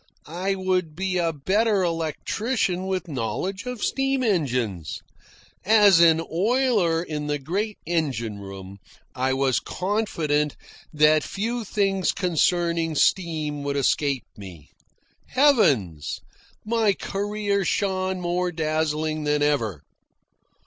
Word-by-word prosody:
I 185 +5 -2
would 185 -4 -1
be 185 +1 -1
a 165 -1 +1
better 195 +7 +1
electrician 180 - -1
with 190 -1 -2
knowledge 180 - -3
of 250 -4 -5
steam 270 -1 0
engines. 125 - -1 0.7
As 205 -4 +6
an 165 -1 +6
oiler 205 -4 +2
in 150 -3 -4
the 145 0 0
great 200 +10 -3
engine 130 -11 -2
room 95 0 -9 0.3
I 130 +1 0
was 135 -1 +1
confident 165 -7 -1 0.4
that 155 0 +4
few 230 +4 -3
things 195 -3 0
concerning 170 -2 +1
steam 155 -4 +1
would 140 0 -2
escape 140 -2 +1
me. 90 -7 -12 0.6
Heavens! 145 - +2 0.5
My 220 -2 +2
career 200 +1 -2
shone 190 0 -1
more 175 +1 -1
dazzling 155 -1 -1
than 150 0 +1
ever. 115 - 0
170 Hz, 110 wpm, -24 LUFS, 145-195 Hz, 0.7 s, As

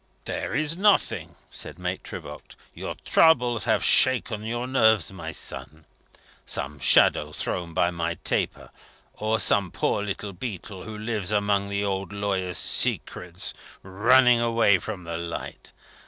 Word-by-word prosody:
"There - - -4
is 155 +1 0
nothing!" 205 +3 +1 0.2
said - - -7
Maitre - - -5
Voigt. - - -12 0.2
"Your - - -6
troubles 125 -8 +3
have - - +1
shaken 120 -4 +4
your 120 +2 -3
nerves, 110 -8 +2
my 80 -3 -7
son. 80 -1 -6 0.6
Some 70 +1 -4
shadow - - +4
thrown 85 -2 -4
by 85 - +2
my 85 -1 -3
taper; - - -2 0.4
or 110 +1 -1
some 100 -3 +3
poor 100 - -1
little 100 0 -5
beetle, 95 -2 -7
who 110 0 -8
lives 105 -3 -3
among 100 -1 0
the 100 0 -1
old 95 -2 -3
lawyer's 95 -3 -2
secrets, 90 0 +1 0.3
running 120 +6 +4
away 115 -4 +3
from 100 -3 -7
the 85 0 -5
light. 85 0 -7
100 Hz, 140 wpm, -25 LUFS, 90-115 Hz, 0.6 s, shaken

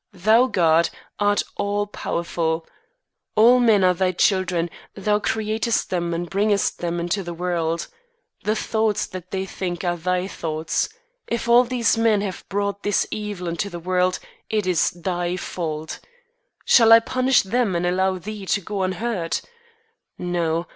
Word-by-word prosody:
Thou, 220 +7 +4
God, 165 -6 +3 0.3
art 205 0 +2
all 205 0 0
powerful. 170 -4 -2 0.7
All 235 +4 +6
men 220 -5 +4
are 180 0 +5
thy 185 +1 +1
children, 180 -2 +1 0.2
thou 210 +1 +1
createst 220 +2 -1
them 175 -2 -1
and 170 +1 -2
bringest 200 +2 +1
them 175 0 -2
into 175 +4 -1
the 175 -2 -6
world. 170 -1 -1 0.6
The 215 - +1
thoughts 220 -1 0
that 185 -1 -9
they 190 0 -2
think 180 -2 -4
are 175 -1 0
thy 180 +2 -1
thoughts. 160 - -2 0.4
If 235 0 -2
all 240 +1 +6
these 235 -2 +1
men 220 -3 +3
have 195 -3 -5
brought 200 0 -1
all - - -44
this 205 -1 +1
evil 205 -4 -4
into 170 +4 -2
the 175 - -7
world, 180 +1 +1 0.3
it 215 -2 0
is 180 -4 +2
thy 175 0 -3
fault. 160 -3 -5 0.7
Shall 225 -2 +6
I 225 - +10
punish 255 +2 +2
them 210 -1 0
and 170 +1 0
allow 185 +1 +1
thee 200 +2 -7
to 200 - +2
go 200 +1 -4
unhurt? 185 -1 -2 0.7
No. 170 -1 -1
185 Hz, 155 wpm, -22 LUFS, 175-210 Hz, 0.7 s, I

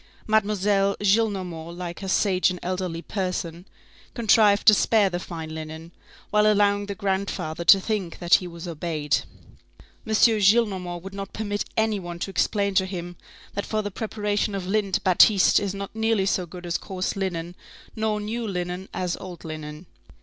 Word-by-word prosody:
Mademoiselle 205 -2 +2
Gillenormand, 190 -6 0
like 175 0 -6
a 195 - -4
sage 185 -1 +3
and 180 -1 -4
elderly 180 -2 -3
person, 180 -3 -4 0.5
contrived 215 -3 +4
to 215 - +9
spare 210 -1 +3
the 175 - -2
fine 160 -3 -7
linen, 160 +1 -8 0.4
while 210 0 +4
allowing 205 0 +2
the 200 - -4
grandfather 190 -4 -2
to 195 +3 +8
think 195 -4 -3
that 175 -1 -1
he 180 - +5
was 170 0 -8
obeyed. 155 -3 -1 0.9
M. - - -4
Gillenormand 200 -5 +3
would 195 +1 -8
not 195 -1 -7
permit 205 -1 -2
any 220 -2 +1
one 175 -2 -7
to 195 - -4
explain 200 0 0
to 190 0 +2
him, 175 -2 -6 0.4
that 200 - -2
for 215 -1 -2
the 205 - -4
preparation 210 -1 -2
of 190 -2 -4
lint 200 0 0
batiste 190 +2 +5
is 200 -1 -3
not 200 +2 -7
nearly 220 -3 +1
so 185 -2 0
good 180 +1 -10
as 170 - -1
coarse 185 -2 -3
linen, 175 -3 -3 0.4
nor 220 -1 -1
new 225 +2 -3
linen 180 0 -4
as 180 -2 -1
old 180 -3 -9
linen. 155 +1 -7
190 Hz, 165 wpm, -24 LUFS, 175-205 Hz, 0.9 s, to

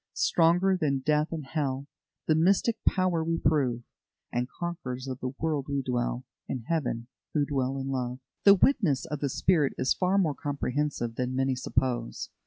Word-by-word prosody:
"Stronger 180 +3 +3
than 140 -6 0
death 150 0 +3
and 160 -4 -4
hell 135 -2 -2 0.4
The 155 - +3
mystic 195 +8 +3
power 185 -3 +2
we 165 +1 0
prove; 125 -8 +1 0.5
And 125 +1 -1
conquerors 135 -7 -5
of 130 -1 -4
the 130 +1 -4
world, 155 -3 -1
we 140 -1 -1
dwell 125 0 -1 0.2
In 130 - -3
Heaven, 125 -6 -1 0.3
who 145 -1 +3
dwell 135 -2 -1
in 135 0 -3
love." 125 -2 -2 0.3
The 200 0 +9
witness 190 - +2
of 150 - -4
the 140 - -1
Spirit 155 0 +2
is 130 - +2
far 185 +1 +1
more 165 -7 +2
comprehensive 145 -4 -2
than 125 0 -1
many 135 0 +1
suppose. 125 - -2
140 Hz, 170 wpm, -28 LUFS, 130-165 Hz, 0.5 s, The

